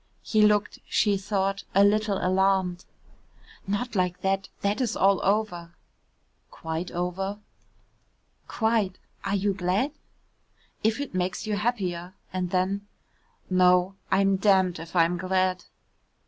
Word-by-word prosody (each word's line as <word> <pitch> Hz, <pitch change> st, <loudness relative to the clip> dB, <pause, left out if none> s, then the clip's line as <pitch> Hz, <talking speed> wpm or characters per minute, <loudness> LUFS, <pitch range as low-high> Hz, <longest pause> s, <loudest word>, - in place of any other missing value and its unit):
He 215 Hz, -, +2 dB
looked, 210 Hz, 0 st, +3 dB
she 205 Hz, -2 st, +3 dB
thought, 195 Hz, 0 st, -1 dB
a 200 Hz, -, +7 dB
little 210 Hz, 0 st, +2 dB
alarmed. 185 Hz, -1 st, +1 dB, 0.8 s
"Not 215 Hz, +5 st, -2 dB
like 180 Hz, -1 st, 0 dB
that, 195 Hz, 0 st, 0 dB
that 205 Hz, +4 st, 0 dB
is 235 Hz, -4 st, -1 dB
all 195 Hz, 0 st, +3 dB
over." 190 Hz, -5 st, -1 dB, 0.7 s
"Quite 160 Hz, +2 st, -5 dB
over?" 180 Hz, +3 st, -3 dB, 1.1 s
"Quite 220 Hz, -4 st, 0 dB, 0.3 s
are 200 Hz, -, 0 dB
you 200 Hz, 0 st, +1 dB
glad?" 190 Hz, +9 st, 0 dB, 0.9 s
"If 220 Hz, +3 st, +1 dB
it 285 Hz, -6 st, -5 dB
makes 185 Hz, +2 st, -2 dB
you 215 Hz, -1 st, -1 dB
happier," 190 Hz, -5 st, -2 dB, 0.2 s
and 185 Hz, -1 st, -2 dB
then, 190 Hz, +3 st, -1 dB, 0.6 s
"No, 180 Hz, 0 st, +4 dB, 0.2 s
I'm 195 Hz, 0 st, +3 dB
damned 190 Hz, -3 st, +3 dB
if 165 Hz, +2 st, -10 dB
I'm 170 Hz, 0 st, +3 dB
glad." 185 Hz, 0 st, 0 dB
190 Hz, 120 wpm, -26 LUFS, 180-205 Hz, 1.1 s, a